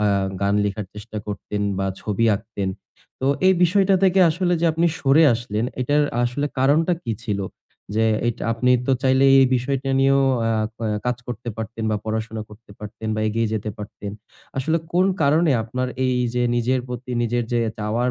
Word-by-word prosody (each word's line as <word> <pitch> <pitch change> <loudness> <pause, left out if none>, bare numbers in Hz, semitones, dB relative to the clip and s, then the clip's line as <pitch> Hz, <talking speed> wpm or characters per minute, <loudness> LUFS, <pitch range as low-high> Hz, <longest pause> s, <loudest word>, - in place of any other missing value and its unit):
অ্যা 105 -1 +3 0.3
গান 100 0 +2
লেখার 100 0 -3
চেষ্টা 105 +1 -7
করতেন 105 0 -4 0.2
বা 95 - 0
ছবি 110 +2 -1
আঁকতেন। 100 -2 -5 0.5
তো 130 - -1 0.2
এই 190 - +5
বিষয়টা 195 +2 +3
থেকে 190 0 +4
আসলে 175 +2 0
যে 170 - +2
আপনি 165 +2 +2
সরে 145 +3 +5
আসলেন 115 -1 -3 0.2
এটার 145 +3 +2 0.2
আসলে 145 +4 -1
কারণটা 150 +6 +3
কী 115 - -1
ছিল? 105 -3 -2 0.6
যে 110 +1 +2 0.2
এইটা 120 - -2
আপনি 125 +2 +1 0.2
তো 135 - +3
চাইলেই 135 +1 +5
এই 130 - +5
বিষয়টা 135 +2 -2
নিয়েও 135 0 +4 0.3
আ - - +1 0.3
আ - - 0 0.2
কাজ 125 - 0
করতে 120 0 -5
পারতেন 110 0 -5
বা 105 - +1
পড়াশোনা 110 0 -3
করতে 105 0 -16
পারতেন 105 +1 -7
বা - - -1
এগিয়ে 115 +1 0
যেতে 105 0 -3
পারতেন। 105 -1 -7 0.5
আসলে 160 +5 +1
কোন 185 +2 +3 0.2
কারণে 155 +3 +3
আপনার 125 +3 -3 0.2
এই 125 - +1 0.2
যে 125 - +1
নিজের 125 +2 +1
প্রতি 125 +1 -7
নিজের 120 +1 0
যে 120 - +2 0.2
চাওয়ার 115 +4 0
120 Hz, 180 wpm, -22 LUFS, 110-135 Hz, 0.6 s, এই